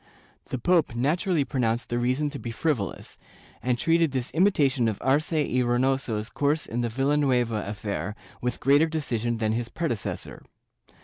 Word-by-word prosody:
The - - -3
pope 160 -2 +2
naturally 150 +4 +1
pronounced 120 -4 -1
the 120 - 0
reason 130 +5 0
to 140 - -6
be 120 - -5
frivolous, 115 - -2 0.4
and 125 -1 0
treated 165 0 +2
this 130 -2 -2
imitation 145 - +3
of 110 -3 -1
Arce 145 +5 +1
y 145 -5 +1
Reynoso's 120 -3 0
course 145 +2 0
in 120 +2 -2
the 120 - -1
Villanueva 130 -3 +1
affair 100 -2 -4 0.3
with 125 0 -2
greater 145 +4 +4
decision 120 -7 -1
than 110 -1 0
his 115 +1 -2
pre 165 -1 -2
decessor. 110 -6 -4
130 Hz, 160 wpm, -26 LUFS, 115-150 Hz, 0.4 s, greater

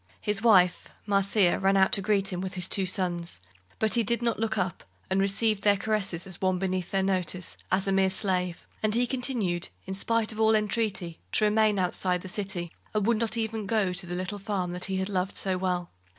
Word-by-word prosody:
His 210 -1 0
wife, 185 -6 +4 0.2
Marcia, 200 -2 +3
ran 195 +1 +3
out 190 0 +4
to 200 - +4
greet 195 -1 0
him, 180 - -3
with 190 0 -5
his 180 0 +1
two 190 -1 +1
sons, 175 - 0 0.4
but 220 -1 0
he 235 - +4
did 235 +2 0
not 235 -2 0
look 220 0 -1
up, 185 -2 -2 0.3
and 190 - +2
received 200 +2 +2
their 205 -1 +4
caresses 195 -4 -1
as 190 -2 -8
one 185 -1 +1
beneath 185 -1 -2
their 195 -1 0
notice, 185 -2 -2 0.2
as 190 +1 +2
a - - +1
mere 190 0 +3
slave, 185 -2 -1 0.2
and 215 0 +2
he 245 +1 +3
continued, 240 -9 -1 0.2
in 190 - -5
spite 225 +3 +1
of 220 - -8
all 220 0 +4
entreaty, 210 -5 -1
to 215 - +3
remain 210 0 +3
outside 180 -1 0
the 185 - -8
city, 185 -3 -3 0.2
and 210 -2 +1
would 230 0 +2
not 230 0 0
even 220 -2 -2
go 200 -4 +1
to 180 0 -2
the 175 - -4
little 185 +3 -4
farm 190 -3 -3
he 190 -1 -2
had 190 0 -1
loved 190 -1 -2
so 190 -1 +1
well. 180 -1 -2
195 Hz, 215 wpm, -27 LUFS, 185-215 Hz, 0.4 s, wife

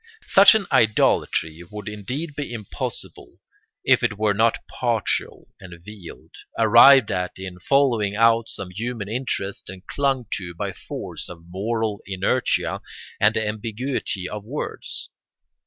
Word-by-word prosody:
Such 195 +2 +7
an 215 -3 +1
idolatry 85 -6 +2
would 105 -1 -8
indeed 125 +10 -5
be 145 -3 -4
impossible 110 -4 -6 0.5
if - - +4
it 105 - 0
were 105 -1 +2
not 115 +3 +2
partial 120 -3 -2
and 90 -2 -11
veiled, 105 -5 -11 0.3
arrived 135 -6 +7
at 90 -2 -3
in 95 -1 -8
following 115 -4 +2
out 115 +1 +3
some 95 -2 -5
human 115 +1 -4
interest 110 -4 -3
and 95 0 -10
clung 135 -3 0
to 85 -3 -7
by - - -4
force - - -7
of 85 -2 -11
moral 105 +3 -2
inertia 95 -1 0 0.4
and 105 +2 +4
the 110 -1 0
ambiguity 110 -2 -3
of 105 +1 -6
words. 130 +8 -6
105 Hz, 135 wpm, -23 LUFS, 95-120 Hz, 0.5 s, Such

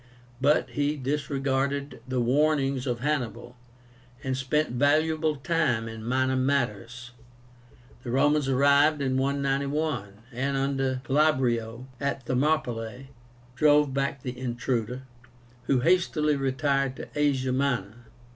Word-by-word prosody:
But 145 +3 +2
he 145 +1 -1
disregarded 140 -1 -2
the 130 -1 -1
warnings 135 +1 +1
of 120 -1 -2
Hannibal, 130 -4 -2 0.7
and 130 -1 -1
spent 135 +2 0
valuable 155 +4 +2
time 135 -6 0
in 110 0 -8
minor 130 +2 +1
matters. 125 -3 -1 0.9
The 125 - -7
Romans 145 +2 +2
arrived 140 +3 +4
in 130 -2 0
191, 140 -3 -1 0.2
and 135 +3 -1
under 135 -1 -1
Glabrio 130 -5 +1
at 140 -1 -2
Thermopylae 125 -2 -1 0.4
drove 150 0 +4
back 140 0 -2
the 125 -1 -4
intruder, 125 0 -3 0.6
who 130 -2 +2
hastily 155 -2 +2
retired 135 0 0
to - - -8
Asia 140 -3 +1
Minor. 120 -4 -2
135 Hz, 110 wpm, -27 LUFS, 125-145 Hz, 0.9 s, arrived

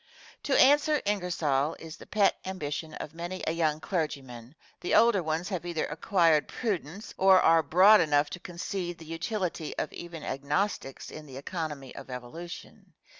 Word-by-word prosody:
"To 280 - +3
answer 295 +2 +5
Ingersoll" 170 -8 0
is 160 0 -10
the - - -13
pet 205 -1 +2
ambition 160 -4 -5
of 150 - -7
many 175 +3 -6
a - - +1
young 160 -2 0
clergyman 140 - -4 0.2
the - - 0
older 230 -4 +5
ones 160 +3 -2
have 185 -5 -3
either 170 -2 -2
acquired 165 -7 +2
prudence 200 - -4
or 190 -1 +7
are 165 -1 +5
broad 185 +8 +6
enough 145 -1 +2
to 180 - -6
concede 175 0 -5
the 165 - -12
utility 165 0 -3
of - - -3
even 170 -2 -8
Agnostics 140 +2 -2
in 155 -1 -10
the 130 -1 -9
economy 150 -3 -5
of - - -10
evolution. 130 +8 -9
165 Hz, 160 wpm, -28 LUFS, 150-185 Hz, 0.2 s, or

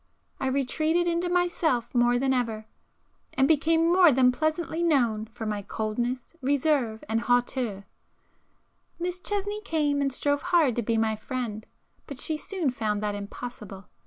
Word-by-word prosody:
I 265 - -1
retreated 310 +6 +1
into 345 +1 0
myself 335 -9 0
more 240 0 +3
than 265 +1 +1
ever,—and 230 +2 -4
became 325 +2 +3
more 360 -3 +7
than 255 -1 +4
pleasantly 315 +4 -1
known 240 -10 +2
for 225 0 -8
my 210 -1 -2
coldness, 235 +7 -3
reserve 270 -4 +1
and 225 +1 0
hauteur. 245 -5 0 1.1
Miss 355 +1 -3
Chesney 410 +2 -3
came, 300 -6 0
and 275 -1 +1
strove 285 +2 0
hard 340 -8 +3
to - - +2
be 230 0 0
my 220 -1 +1
friend,—but 240 +3 -7
she 315 - -1
soon 325 -2 -2
found 215 -3 -2
that 210 -1 -1
impossible. 205 -1 -8
260 Hz, 140 wpm, -27 LUFS, 225-320 Hz, 1.1 s, more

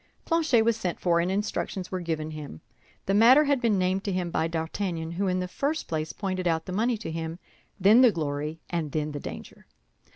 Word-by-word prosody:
Planchet 315 -9 +3
was 230 0 +2
sent 180 -6 -3
for, 170 -2 +2
and 175 +2 0
instructions 195 -2 -3
were 185 - -2
given 160 -3 -3
him. 150 - -8 0.4
The 195 - 0
matter 240 +8 +7
had 280 -3 +1
been 225 -4 +2
named 185 +1 0
to 200 - -1
him 180 -2 -2
by 160 - 0
D'Artagnan, 165 0 -3
who 195 +3 -1
in 185 0 0
the 180 - -3
first 290 - -2
place 155 -1 -2
pointed 185 -3 -3
out 160 -1 0
the - - -6
money 230 +4 +1
to 205 -6 -6
him, 165 0 -4 0.4
then 210 +6 +6
the 250 -3 +7
glory, 150 -1 -3
and 160 -5 -3
then 155 -1 -1
the 145 - -5
danger. - - -9
180 Hz, 215 wpm, -27 LUFS, 160-210 Hz, 0.4 s, matter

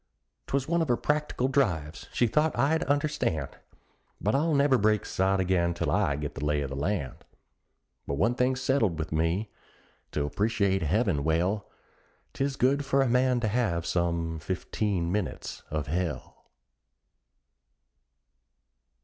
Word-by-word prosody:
'Twas 135 -1 -1
one 170 +1 +1
of 160 - 0
her 120 -2 +2
practical 150 -4 0
drives 90 - 0
she 120 - +2
thought 150 +7 +1
I'd 160 +4 +2
understand! 140 - 0 0.7
But 105 - 0
I'll 155 +3 +2
never 140 -2 +4
break 105 0 +2
sod 95 +1 +1
again 90 -2 +1
till - - -1
I 70 - +2
get 75 0 -4
the 70 - -6
lay 75 0 +1
of 70 -1 -4
the - - -4
land. 70 -2 -2 0.9
But 70 - -1
one 110 +11 +2
thing's 125 +1 0
settled 110 - +1
with 80 -1 -4
me 85 +7 0 0.6
to 75 - 0
appreciate 100 +2 +1
heaven 90 - +1
well, 90 +7 0 0.6
'Tis 135 0 -1
good 135 +3 +2
for 135 0 +2
a - - +1
man 125 +1 +3
to 110 - +1
have 100 -7 0
some 85 -2 -1
fifteen 90 +1 -2
minutes 105 0 -3
of 75 -1 -2
hell. 85 +2 -4
100 Hz, 145 wpm, -28 LUFS, 85-130 Hz, 0.9 s, never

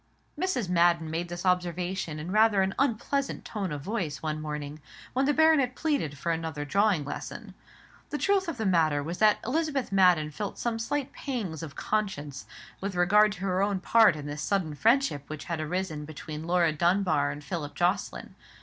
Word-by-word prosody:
Mrs. 305 - -1
Madden 170 -2 +3
made 170 +2 -3
this 175 +1 -6
observation 180 -2 -1
in 160 +4 -5
rather 215 -2 +4
an 190 +1 -1
unpleasant 275 +2 -1
tone 200 -6 -3
of 145 -1 -4
voice 180 -8 -3
one 155 -1 -3
morning 150 0 -5 0.3
when 265 +2 +2
the 290 - +3
baronet 295 -4 +4
pleaded 280 - -1
for 170 +5 -1
another 160 -3 -3
drawing 200 -1 +2
lesson. 145 - -7 0.6
The 295 - -2
truth 390 +2 +2
of 330 -6 -3
the 220 - -2
matter 160 -6 +2
was 170 +4 -5
that 215 -1 +5
Elizabeth 280 -2 -1
Madden 180 -6 +4
felt 205 +6 -5
some 230 -1 -2
slight 280 +4 -2
pangs 210 - -4
of 155 -4 -8
conscience 150 -11 -3 0.3
with 195 -1 -4
regard 205 +4 +4
to 190 - -11
her 190 -1 0
own 200 -1 +1
part 225 +2 +5
in 150 -1 -7
this 145 +1 -5
sudden 180 -3 0
friendship 225 - +2
which 155 -1 -6
had 170 -2 -3
arisen 155 -1 -3
between 155 +1 -7
Laura 175 -2 +3
Dunbar 170 -3 +2
and 145 +1 -6
Philip 150 -1 -5
Jocelyn. 185 +3 -1
180 Hz, 180 wpm, -28 LUFS, 155-220 Hz, 0.6 s, that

